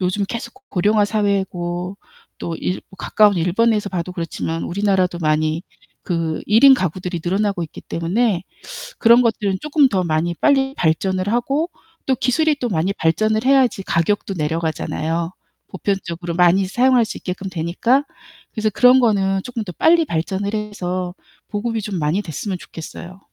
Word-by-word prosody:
요즘 185 +2 0
계속 235 - -6 0.2
고령화 205 +3 +2
사회고 190 -3 -1 0.4
또 170 - -4
일 180 - -3 0.2
가까운 210 0 +3
일본에서 205 +5 +1
봐도 180 -1 -4
그렇지만 165 -1 -4
우리나라도 190 -2 0
많이 155 +1 0 0.4
그 165 -3 -2
1 215 +3 +4
인 275 - +10
가구들이 180 -3 -3
늘어나고 195 0 0
있기 155 - -11
때문에 190 +3 -1 0.6
그런 235 +1 +6
것들은 205 -4 0
쪼끔 300 -2 +3
더 190 -4 0
많이 170 +1 0
빨리 270 - +2
발전을 185 +4 0
하고 275 +8 0 0.4
또 265 - +2
기술이 300 +6 +1
또 245 - -1
많이 185 +1 0
발전을 215 +7 +1
해야지 265 -7 +3
가격도 195 +4 0
내려가잖아요 165 +1 -2 0.4
보편적으로 175 -3 -3
많이 180 +2 +4
사용할 245 +3 +3
수 225 - -6
있게끔 190 +1 -5
되니까. 185 - +1 0.5
그래서 215 -1 0
그런 250 +5 +5
거는 195 -5 +2
쪼끔 240 -3 -4
더 180 - -7
빨리 330 - +4
발전을 190 - -2
해서 185 -4 -3 0.3
보급이 225 +1 -2
좀 200 -2 -4
많이 155 +6 0
됐으면 185 +2 -4
좋겠어요. 175 +3 -10
195 Hz, 340 characters per minute, -20 LUFS, 175-220 Hz, 0.6 s, 인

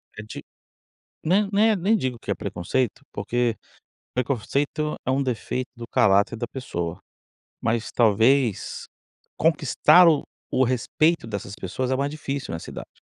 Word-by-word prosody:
É 105 - -7
de 110 - -9 0.8
n 195 +5 +3
né, 215 +1 +4
nem 200 +5 +2
digo 130 - -2
que - - -7
é - - +2
preconceito, 100 +5 -2
porque 115 +2 -1 0.6
preconceito 140 +4 -1
é 130 - +1
um 135 +1 +1
defeito 125 +1 -3
do 120 -1 -7
caráter 100 +2 +3
da 120 +1 -4
pessoa, 90 -9 -4 0.6
mas 115 -1 -1
talvez 115 +1 +2 0.5
conquistar 180 -1 +5
o 155 -3 +3 0.3
o 130 - +3
respeito 130 +3 +1
dessas 100 -1 -5
pessoas 125 +6 -3
é - - +2
mais 140 +1 -1
difícil 140 - -4
nessa 80 - -6
idade. - - -10
125 Hz, 140 wpm, -24 LUFS, 110-140 Hz, 0.8 s, conquistar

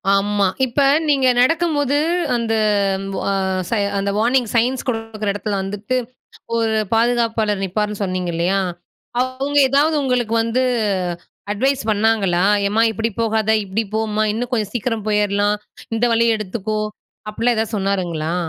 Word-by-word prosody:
ஆமா. 200 0 +1 0.2
இப்ப 260 +3 -1 0.3
நீங்க 275 -3 +3
நடக்கும்போது 290 0 +2 0.4
அந்த 230 -1 -1 0.6
வ - - -3 0.5
ச - - -13 0.3
அந்த 200 0 -1
வார்னிங் 240 +3 +2
சயின்ஸ் 245 +3 +1
குடுக்குற 225 -3 -2
இடத்துல 205 0 -3
வந்துட்டு, 205 +5 -3 0.6
ஒரு 225 -1 +1 0.2
பாதுகாப்பாளர் 225 -3 +1
நிப்பார்ன்னு 210 +2 -2
சொன்னீங்க 185 -2 -2
இல்லையா, 175 +4 +1 0.6
அவங்க 260 +3 -2
எதாவது 295 +4 +3
உங்களுக்கு 245 -4 0
வந்து 230 +3 0 0.9
அட்வைஸ் 265 +6 0
பண்ணாங்களா? 205 -4 +2 0.2
எம்மா 215 +3 +2
இப்டி 225 +2 -2
போகாத, 220 -1 +1
இப்டி 200 +4 -2
போம்மா, 215 -1 0
இன்னும் 240 +3 -3
கொஞ்சம் 215 -4 -1
சீக்கிரம் 225 -2 -2
போயரலாம் 205 0 +1 0.4
இந்த 230 - +1
வழிய 230 0 +3
எடுத்துக்கோ, 215 +1 -3 0.5
அப்டிலாம் 230 +3 0
எதாவது 220 0 -1
சொன்னாருங்களா? 175 -5 -1
220 Hz, 125 wpm, -19 LUFS, 205-245 Hz, 0.9 s, நீங்க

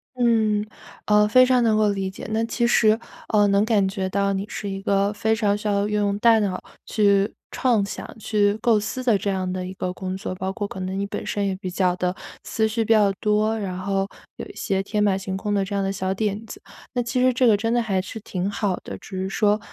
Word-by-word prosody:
嗯， 220 -4 +2 0.4
呃， 210 0 +4
非 255 +4 +6
常 250 -1 +3
能 220 -2 +3
够 215 -1 +3
理 195 -1 -1
解， 190 - -9
那 220 +1 +1
其 235 +1 0
实， 220 -1 +4 0.3
呃， 210 -2 +4
能 200 0 +3
感 205 -4 +2
觉 190 -1 -3
到 200 0 +1
你 195 +1 -2
是 205 - -5
一 195 0 -5
个 200 +1 +1
非 220 +1 +1
常 210 -2 +1
需 210 0 -5
要 200 0 +1
用 205 -1 0
大 225 0 +5
脑 190 -3 -1 0.3
去 200 -2 +3 0.2
创 235 -6 +2
想、 200 - -8
去 205 -1 +1
构 220 -1 +2
思 215 +5 -4
的 235 -4 +3
这 200 - -2
样 185 -1 -1
的 185 0 -3
一 185 - -6
个 180 -1 -3
工 185 0 -5
作。 185 - -5
包 190 +1 -3
括 205 0 -4
可 190 - -8
能 185 +1 -3
你 200 - -1
本 - - -5
身 205 -1 -1
也 195 -1 -1
比 185 -1 -6
较 180 0 +1
的 180 0 -1 0.3
思 220 -1 0
绪 225 +1 -1
比 220 - -2
较 210 -3 +5
多， 215 +1 +1
然 185 -3 -4
后 195 0 -1 0.3
有 - - -6
一 - - -13
些 195 0 -1
天 210 +1 -1
马 200 -2 +3
行 190 0 -4
空 205 +1 -2
的 200 -1 +2
这 200 +1 -4
样 195 - 0
的 195 - -1
小 190 -1 -2
点 210 +1 -2
子， 395 - -9 0.3
那 245 - 0
其 240 +2 -1
实 255 0 +5
这 255 +1 +2
个 220 -3 +6
真 225 +3 -1
的 240 - +2
还 195 -4 0
是 195 +4 -8
挺 190 -2 -3
好 205 -2 -1
的。 - - -7
只 185 -2 -7
是 190 - -2
说， 210 +2 +2
205 Hz, 270 characters per minute, -23 LUFS, 195-220 Hz, 0.4 s, 非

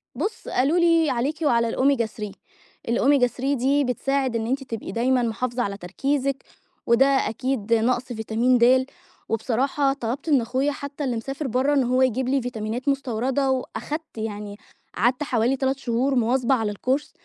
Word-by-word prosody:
بُصّ، 400 - -4
قالوا 280 +7 +1
لي 335 -3 +4
عليكِ 275 +7 -1
وعلى 235 -6 +2
الomega 265 -3 +2
3، 210 -2 -7 0.6
الomega 265 +2 +4
3 265 +3 -2
دي 275 +3 +2
بتساعد 265 0 -1
إن 225 -1 -1
أنتِ 270 +3 -1
تبقي 225 -4 -6
دايمًا 250 +2 +1
محافظة 240 +2 -1
على 200 -2 -3
تركيزِك، 270 +9 -2 0.4
وده 235 +3 +5
أكيد 255 -3 0
نقص 240 +2 +2
فيتامين 235 +1 +1
دال، 255 +2 +5 0.4
وبصراحة 265 +5 +1
طلبت 270 +4 -4
من 280 -4 +4
أخويا 260 +5 0
حتى 280 +1 -6
اللي 250 -3 -1
مسافر 270 +5 -4
برّه 260 +4 +1
إن 275 -2 +3
هو 255 +1 +1
يجيب 255 0 +1
لي 275 0 +2
فيتامينات 240 +2 -3
مستوردة، 265 0 0
وأخدت 295 +3 -4
يعني 210 -2 -5 0.4
قعدت 250 +8 +1
حوالي 250 -1 +1
3 265 0 0
شهور 260 +2 0
مواظبة 250 +2 +2
على 220 -4 -1
الcourse 260 +7 -1
255 Hz, 160 wpm, -24 LUFS, 230-275 Hz, 0.6 s, وده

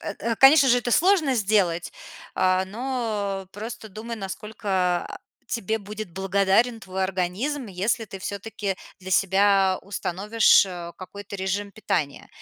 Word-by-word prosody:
Э, - - -5
э, 230 0 -1
конечно 270 +2 +7
же, 245 0 +5
это 240 0 -3
сложно 330 - +3
сделать. 195 -6 +1 0.4
А, 185 0 +2
но 210 -4 -3
просто 220 +1 -7
думай, 225 +3 -7
насколько, 195 -3 -2
а, - - -8 0.3
тебе 220 -1 -1
будет 210 -1 -7
благодарен 195 +5 +2
твой 190 -2 -3
организм, 195 +10 -2
если 210 +4 -1
ты 195 - -8
всё-таки 200 +1 -4 0.3
для 190 0 -8
себя 195 0 +3
установишь, 205 +4 +3
э, 175 -2 -7
какой-то 200 +2 -9
режим 195 +2 -2
питания. 180 -10 -2
200 Hz, 135 wpm, -24 LUFS, 190-225 Hz, 0.4 s, конечно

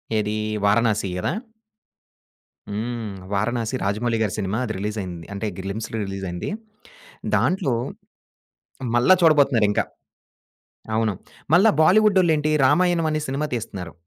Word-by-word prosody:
ఏది 105 0 0 0.3
వారణాసి 105 -1 +2
గదా? 90 - -1 1.4
హ్మ్. 110 0 -3 0.2
వారణాసి 115 +4 -1
రాజమౌళి 110 +4 0
గారి 105 -4 0
సినిమా 100 +1 -1
అది 110 - -3
రిలీజయింది. 95 -4 -4
అంటే 100 +2 -3
గ్లిమ్స్‌లో 100 +4 -4
రిలీజ్ 95 0 -5
అయింది. 90 - -4 0.9
దాంట్లో 145 -9 +1 1.2
మళ్ళా 120 +10 +6
చూడబోతున్నారింకా 135 -10 +4 1.1
అవును. 110 -1 +1 0.4
మళ్ళా 195 +7 +6
బాలీవుడ్డొళ్ళేంటి 180 -4 +4 0.2
రామాయణం 170 +2 +3
అనే 155 - 0
సినిమా 140 +3 -1
తీస్తున్నారు. 95 -7 -5
115 Hz, 100 wpm, -23 LUFS, 100-150 Hz, 1.4 s, మళ్ళా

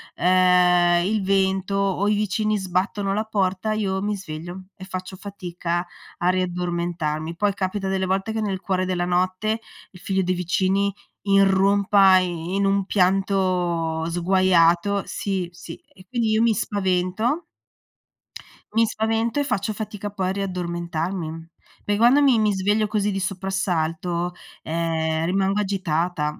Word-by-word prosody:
ehm, 180 -1 +4
il 210 +1 0
vento 190 0 +1
o 195 0 0
i - - +3
vicini 215 +1 0
sbattono 195 +1 -1
la 215 +2 0
porta, 200 -1 -1
io 195 -3 -1
mi 205 0 -1
sveglio, 175 +1 -8
e - - -11
faccio 185 0 -6
fatica 175 -3 -4 0.3
a 175 - -1
riaddormentarmi. 175 -3 -2
Poi, 205 +1 +1
capita 195 +1 -3
delle 190 0 0
volte 195 +4 -1
che 220 - -2
nel 195 -3 -2
cuore 185 -1 -1
della 180 -1 -1
notte, 185 +5 0 0.3
il 180 - -14
figlio 190 -1 0
dei 185 0 0
vicini 190 +3 0 0.3
irrompa 195 0 +5
i 175 -1 -2
in 200 0 +1
un 195 0 +2
pianto 180 -4 +1
sguaiato 180 +2 +3
sì, 190 -3 -3
sì 175 -1 -10
e 185 - -16
quindi 235 -3 0
io 220 +1 +3
mi 230 -1 +4
spavento 200 - -1 1.3
mi 225 0 +4
spavento, 225 +4 -1
e - - +2
faccio 215 -7 -1
fatica 210 -1 -5
poi 190 -2 -2
a - - 0
riaddormentarmi. 170 -3 -4 0.4
Perché 205 0 0
quando 250 +5 +5
mi 260 -5 +4
mi 215 -1 +3
sveglio 205 +3 +1
così 210 -1 0
di 195 - -2
soprassalto, 180 -3 -2 0.3
ehm, 160 -1 -1
rimango 195 +3 +1
agitata. 175 -5 -1
190 Hz, 140 wpm, -23 LUFS, 175-200 Hz, 1.3 s, irrompa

